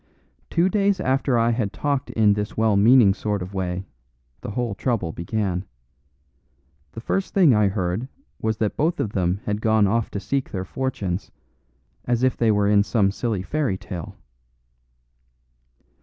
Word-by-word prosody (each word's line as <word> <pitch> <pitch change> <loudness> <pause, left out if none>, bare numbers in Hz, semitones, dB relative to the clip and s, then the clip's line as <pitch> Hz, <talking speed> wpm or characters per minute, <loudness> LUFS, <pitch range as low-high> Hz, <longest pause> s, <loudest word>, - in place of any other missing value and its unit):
Two 170 +2 +2
days 200 0 +1
after 130 -1 +1
I 115 0 +3
had 115 -4 -1
talked 140 +3 -2
in 105 -2 +3
this 105 0 -4
well 110 -2 +3
meaning 110 0 +6
sort 105 -2 -2
of 95 +2 -9
way, 90 -1 -3 0.6
the - - -6
whole 115 0 -2
trouble 100 -6 -1
began. 90 +1 -2 1.3
The 115 - -7
first 195 +10 -2
thing 175 -9 +6
I 105 -2 +4
heard 95 +4 -2 0.3
was 110 0 -1
that 105 -1 -1
both 165 +4 0
of 105 - -1
them 90 0 0
had 105 0 -2
gone 110 -2 +3
off 110 +3 0
to 100 - -4
seek 135 +8 -2
their 95 -1 -4
fortunes, 100 -6 -3 0.8
as 120 0 0
if 130 - +3
they 115 - +1
were 105 -1 +3
in 100 0 +5
some 100 -2 +1
silly 110 -3 -2
fairy 135 -4 -1
tale. 90 -4 -8
110 Hz, 160 wpm, -23 LUFS, 100-125 Hz, 1.3 s, meaning